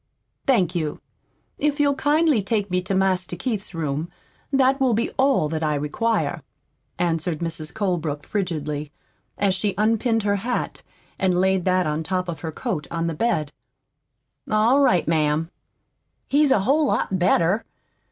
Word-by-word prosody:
"Thank 190 -10 +3
you. 155 -4 -2 0.6
If 295 0 0
you'll 285 -1 +4
kindly 295 -2 +2
take 200 -1 -1
me 180 0 +1
to 190 +2 -2
Master 185 -2 +1
Keith's 205 -1 -3
room, 155 0 -2 0.4
that 270 0 +3
will 255 -4 +3
be 230 - 0
all 265 - +2
that 160 0 -3
I 155 -1 +1
require," 155 +7 -1 0.6
answered 170 -1 0
Mrs. 160 -2 -4
Colebrook 170 -8 -2
frigidly, 150 -7 -3 0.5
as 200 -2 +2
she 200 +1 -1
unpinned 225 +1 +2
her 205 0 +1
hat 240 +5 -3 0.4
and 185 -2 +2
laid 190 -1 +2
that 185 -1 +2
on 150 +1 -1
top 180 +2 -1
of 170 -2 -5
her 160 - -5
coat 175 - -4
on 165 0 -2
the 165 - -1
bed. 155 -5 0 1.0
"All 220 +6 +4
right, 185 -11 +3
ma'am. 155 +1 +1 0.8
He's 290 +1 +3
a 240 -7 +4
whole 285 +8 +2
lot 190 -7 0
better. 180 +3 +2
185 Hz, 150 wpm, -23 LUFS, 165-230 Hz, 1.0 s, you'll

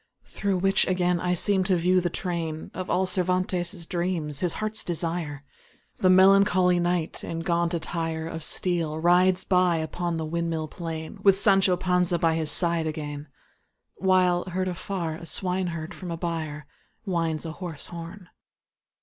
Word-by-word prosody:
Through 200 -2 -2
which 195 +2 +2
again 180 -1 +1
I 180 +1 0
seem 190 +2 +2
to 190 -1 +2
view 180 +2 +3
the 175 - 0
train 165 -3 -4
Of 185 -1 -5
all 190 - +2
Cervantes' 180 -1 -1
dreams, 170 -5 -2
his 175 -2 +1
heart's 215 0 -2
desire: 165 -4 -3 0.6
The 185 - +4
melancholy 185 -1 +5
Knight, 175 -2 -1
in 165 0 -4
gaunt 170 0 0
attire 165 -1 -3
Of 165 -1 -5
steel 165 -2 -1
rides 180 +3 +3
by 180 -2 +3
upon 165 +2 -2
the 160 - -3
windmill 165 -1 -2
plain 165 +2 -6
With 195 -1 +6
Sancho 195 -2 +4
Panza 180 -1 +1
by 165 -1 +2
his 160 -1 -1
side 170 -2 +3
again, 150 -1 -5 0.7
While, 185 -2 +3
heard 185 +1 -2
afar, 175 -2 -4
a 170 - -10
swineherd 180 -4 -2
from 180 - -8
a 165 - -3
byre 160 -4 -4 0.4
Winds 165 -4 -1
a 160 - -4
hoarse 165 -3 -6
horn. 175 +2 -8
175 Hz, 155 wpm, -26 LUFS, 165-185 Hz, 0.7 s, With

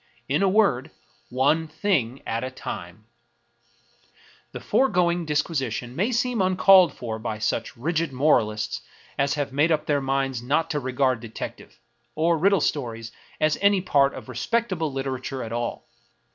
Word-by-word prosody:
In 145 +6 +1
a 195 - +4
word, 185 - +2 0.4
One 145 +6 +2
thing 150 - -1
at 115 +2 -2
a 130 - -3
time! 100 -5 -8 1.5
The - - -7
foregoing 175 -9 +1
disquisition 135 -6 -2
may 205 - 0
seem 245 -2 0
uncalled 185 0 +6
for 110 -2 -5
by 110 -1 -4
such 110 +2 -2
rigid 160 +4 -1
moralists 115 -6 +1 0.4
as 140 +2 +2
have 145 -3 -3
made 150 +4 +3
up 155 -1 +1
their 145 -2 +1
minds 135 -2 -1
not 145 +6 0
to 150 - 0
regard 130 -1 0
detective, 115 -1 -8 0.4
or 165 +2 +2
riddle 190 +2 +3
stories, 115 -6 -2 0.3
as 155 -1 +1
any 200 -1 +4
part 140 -6 +2
of - - -9
respect 215 - -1
able 160 -4 -2
literature 135 -1 -4
at 115 0 -6
all. 120 0 -4
140 Hz, 150 wpm, -24 LUFS, 125-170 Hz, 1.5 s, uncalled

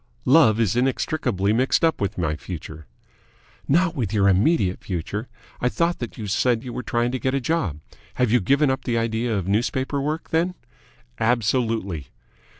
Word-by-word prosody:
"Love 130 -6 +5
is 110 -4 +1
inextricably 125 -5 0
mixed 130 +7 +2
up 160 - 0
with 100 +1 -2
my 75 -4 0
future." 80 -2 -8 0.8
"Not 170 +3 +2
with 115 -9 -2
your 100 -3 +3
immediate 100 - +2
future. 100 +6 -4 0.3
I 125 - +1
thought 170 +3 0 0.2
you 110 - -5
said 115 +3 +1
that - - -14
you 125 - -6
were - - -3
trying 120 0 0
to 130 - -2
get 130 +2 0
a - - +1
job. 120 - -1 0.3
Have 125 -3 +1
you 125 - +5
given 140 +7 +3
up 130 - -3
the 120 -2 0
idea 115 0 0
of 95 -2 -3
newspaper 130 +7 0
work, 155 +3 -3
then?" 175 +3 +1 0.6
"Absolutely." 110 - 0
120 Hz, 170 wpm, -23 LUFS, 100-135 Hz, 0.8 s, Love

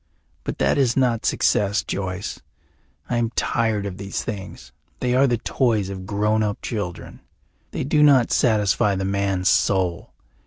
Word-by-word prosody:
But - - -4
that - - +2
is 125 -3 +2
not 125 -4 +1
success, 100 0 +1
Joyce. 95 0 -4 0.7
I 120 - -1
am 115 -1 +1
tired 110 -3 0
of 95 -2 -5
these 100 0 -4
things; 100 -5 -7 0.3
they 125 -1 0
are 135 +2 +4
the 120 -2 +1
toys 110 -4 0
of 95 -1 -7
grown 105 +2 +1
up 105 -1 -1
children; 100 -6 -5 0.5
they - - -4
do 150 +3 +2
not 140 -5 +5
satisfy 105 -2 +2
the 95 0 -2
man's 95 -1 0
soul. 95 -2 +1
105 Hz, 155 wpm, -22 LUFS, 95-120 Hz, 0.7 s, not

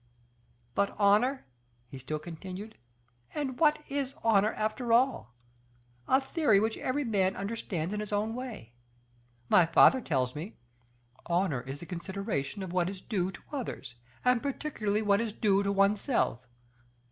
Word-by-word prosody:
But 200 +10 0
honor?" 215 +7 +3 0.4
he 130 +2 -9
still 140 +4 -3
continued, 185 +6 -8 0.6
"and 270 -4 -3
what 300 -1 +3
is 275 -1 -3
honor 215 -1 +4
after 220 +3 -2
all? 235 - +2 0.7
A 265 - +5
theory 270 -6 +2
which 220 +2 0
every 280 +3 -1
man 195 -6 +1
understands 195 -4 -3
in 210 - -2
his 210 -1 -5
own 210 +2 0
way. 235 - -7 0.7
My 175 +4 +5
father 255 +10 +6
tells 130 - 0
me: 165 +8 -7 0.7
'Honor 170 -7 +1
is 135 +3 -8
the - - -7
consideration 185 -2 -4
of 180 -2 -6
what 180 -1 +1
is 195 -1 -7
due 190 -2 -1
to 190 - -10
others, 235 - -5 0.3
and 250 -2 +4
particularly 225 -7 -2
what 200 0 +3
is 225 -3 -3
due 200 -3 +2
to 200 0 0
oneself. 200 - +1
205 Hz, 145 wpm, -30 LUFS, 175-235 Hz, 0.7 s, father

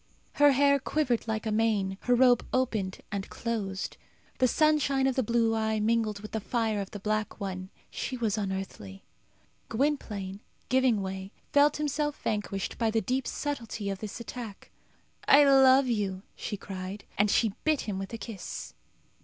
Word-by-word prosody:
Her 290 -1 +8
hair 280 +1 +4
quivered 260 -5 0
like 220 0 -2
a 220 - 0
mane; 210 -3 +1
her 245 - +4
robe 245 -1 +5
opened 220 -7 -1
and 200 -2 -3
closed. 205 -5 -3 0.4
The 255 - +5
sunshine 280 -1 +3
of 265 -1 +2
the 260 - +2
blue 230 -1 +2
eye 220 -1 0
mingled 215 -1 +1
with 215 - -8
the 220 - -1
fire 220 -1 -1
of 195 - -6
the 205 - -7
black 215 +2 -2
one. 190 -2 -4 0.2
She 255 - -4
was 220 -4 0
unearthly. 190 - -5 0.6
Gwynplaine, 215 -7 -1 0.3
giving 250 -5 +3
way, 190 0 -5 0.2
felt 290 +1 +5
himself 295 0 -1
vanquished 205 -2 -2
by 225 -2 +2
the 225 +1 +2
deep 255 +5 -1
subtilty 230 -8 -3
of 195 - -5
this 215 +2 -6
attack. 235 -3 -8 0.6
"I 285 +1 +8
love 270 -1 +6
you!" 200 -6 -1
she 205 - -4
cried. 190 +1 -7 0.2
And 205 +1 +4
she 220 0 +2
bit 310 -2 +2
him 200 -3 -3
with 195 0 -5
a 230 - -4
kiss. 220 -5 -7
220 Hz, 165 wpm, -29 LUFS, 200-260 Hz, 0.6 s, Her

